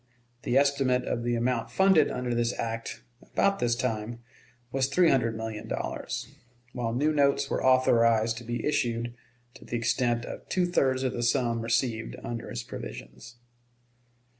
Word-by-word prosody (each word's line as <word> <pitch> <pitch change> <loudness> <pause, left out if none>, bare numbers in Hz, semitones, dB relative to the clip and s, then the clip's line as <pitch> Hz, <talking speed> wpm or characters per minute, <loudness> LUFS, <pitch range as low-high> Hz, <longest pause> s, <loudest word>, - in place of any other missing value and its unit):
The 130 - +1
estimate 135 -3 +3
of 120 - -2
the 120 0 0
amount 115 -1 0
funded 190 -6 +4
under 125 -1 -2
this 120 0 0
act, 115 0 -4 0.2
about 200 0 +1
this 120 -1 +2
time, 115 -1 -3 0.5
was 135 0 +1
three 170 +5 +4
hundred 115 -4 +1
million 110 -1 -5
dollars, - - -4 0.5
while 120 -2 -2
new 145 +6 +1
notes 140 -1 +2
were - - -1
authorized 115 -3 +4
to - - -11
be 120 0 -3
issued 120 -5 0 0.4
to - - -14
the 120 - -3
extent 120 0 0
of - - -9
two 180 -1 +2
thirds 135 -7 +1
of 130 -1 0
the 120 - -3
sum 120 -1 +1
received 115 0 -1
under 115 -1 -5
its - - -4
provisions. 60 - -9
120 Hz, 160 wpm, -28 LUFS, 115-135 Hz, 0.5 s, funded